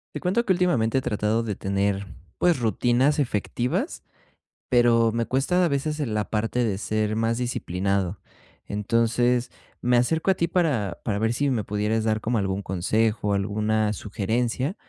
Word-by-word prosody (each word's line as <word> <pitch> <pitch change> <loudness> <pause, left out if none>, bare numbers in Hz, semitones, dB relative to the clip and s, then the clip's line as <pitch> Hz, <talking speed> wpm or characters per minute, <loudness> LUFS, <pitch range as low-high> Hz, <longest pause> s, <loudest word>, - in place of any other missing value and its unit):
Te - - -4
cuento 200 +6 +1
que 190 - +3
últimamente, 135 -10 +1
he - - -5
tratado 110 +1 0
de 105 -4 -3
tener, 100 0 -1 0.3
pues, 175 -6 +2
rutinas 120 +6 +2
efectivas, 130 - -1 0.7
pero 120 -2 +4
me 115 +1 -1
cuesta, 160 +8 +1
a - - +4
veces, 150 +1 -1
en 130 -7 -2
la 105 -1 -1
parte 115 +3 0
de 105 -5 0
ser 110 0 -1
más 115 +1 0
disciplinado. 100 -5 -1 0.5
Entonces, 115 +4 +1 0.3
me 125 0 +2
acerco 160 +9 +2
a - - +4
ti 170 - 0
para 140 - 0
para 100 -3 -1
ver 110 +1 +1
si 140 +4 0
me 120 -5 0
pudieras 105 +2 0
dar 110 -1 +1
como 115 +2 0
algún 95 0 -1
consejo, 105 +3 0
alguna 105 +2 0
sugerencia 115 - -2
115 Hz, 160 wpm, -25 LUFS, 105-130 Hz, 0.7 s, pero